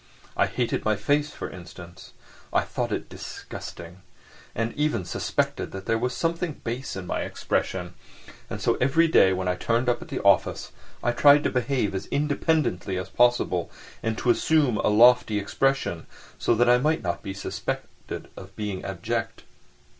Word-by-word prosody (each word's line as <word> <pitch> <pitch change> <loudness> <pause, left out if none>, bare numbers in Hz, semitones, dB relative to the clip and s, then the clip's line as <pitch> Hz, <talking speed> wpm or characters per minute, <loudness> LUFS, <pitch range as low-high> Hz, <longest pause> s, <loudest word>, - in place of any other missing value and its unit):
I - - +3
hated 120 -2 -1
my 110 0 +2
face, 145 +8 +1
for - - -6
instance: 90 -1 -11 0.4
I - - +3
thought - - -3
it - - -3
disgusting, 90 +2 -9 0.5
and 115 +1 -1
even 150 -10 0
suspected - - -2
that 95 0 -7
there 115 0 +1
was 125 +1 -1
something 165 -1 -1
base 120 +3 -4
in 95 -1 -5
my - - -2
expression, - - -2 0.6
and - - -5
so - - +1
every 160 +6 +4
day 95 -11 +5
when 95 0 -1
I 90 - +2
turned 115 +6 0
up 120 +5 +1
at 175 - -9
the 140 -4 -4
office 100 -1 +3 0.3
I 120 - +2
tried 145 +4 +6
to - - +1
behave 125 -4 0
as 95 +1 -4
independently 145 - 0
as 90 - -4
possible, 120 -8 +2 0.3
and 115 -1 -2
to 125 - +3
assume 145 -2 +2
a - - +1
lofty 115 0 +5
expression, 105 -4 0 0.3
so 120 - +2
that 120 +2 +3
I 125 0 +6
might 155 +4 +1
not 85 -2 -2
be 95 - -6
suspected 95 - -5
of 95 +1 -11
being 105 -3 -4
abject. 95 -3 -3
115 Hz, 170 wpm, -25 LUFS, 95-135 Hz, 0.6 s, tried